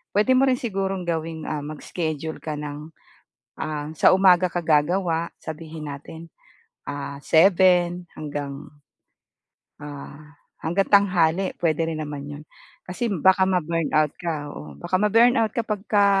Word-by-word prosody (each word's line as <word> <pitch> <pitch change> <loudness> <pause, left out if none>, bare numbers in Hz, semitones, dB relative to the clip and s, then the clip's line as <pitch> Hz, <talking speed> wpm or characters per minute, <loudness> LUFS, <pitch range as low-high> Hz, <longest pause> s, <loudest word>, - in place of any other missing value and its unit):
puwede 215 +5 +4
mo 270 - +5
rin 255 - +2
sigurong 195 -5 -2
gawing, 160 -1 -3
ah, 150 -2 -3
mag 155 0 -7
schedule 160 -2 -4
ka 155 -1 -4
ng, 150 +1 -7 0.7
ah, 150 -1 -4
sa - - +5
umaga 185 -1 +5
ka 175 - -1
gagawa. 165 +2 +1
Sabihin 160 -1 -7
natin, 160 +4 -9 0.6
ah, 140 0 -5
7 175 +1 +4
hanggang, 145 -2 -6 1.2
ah, 145 +1 -10 0.3
hanggang 185 +5 +1
tanghali 185 -2 +3
puwede 165 -1 +1
rin 155 -1 -4
naman 145 -2 -6
'yon. 145 +1 -8 0.4
Kasi, 210 +7 -2
baka 190 +2 +4
ma-burnout 165 -4 +1
ka, 155 -4 -3
oo. - - -10
Baka 175 +2 -2
ma-burnout 225 +1 +4
ka 235 - +1
pagka 205 -1 +1
165 Hz, 135 wpm, -23 LUFS, 150-190 Hz, 1.2 s, mo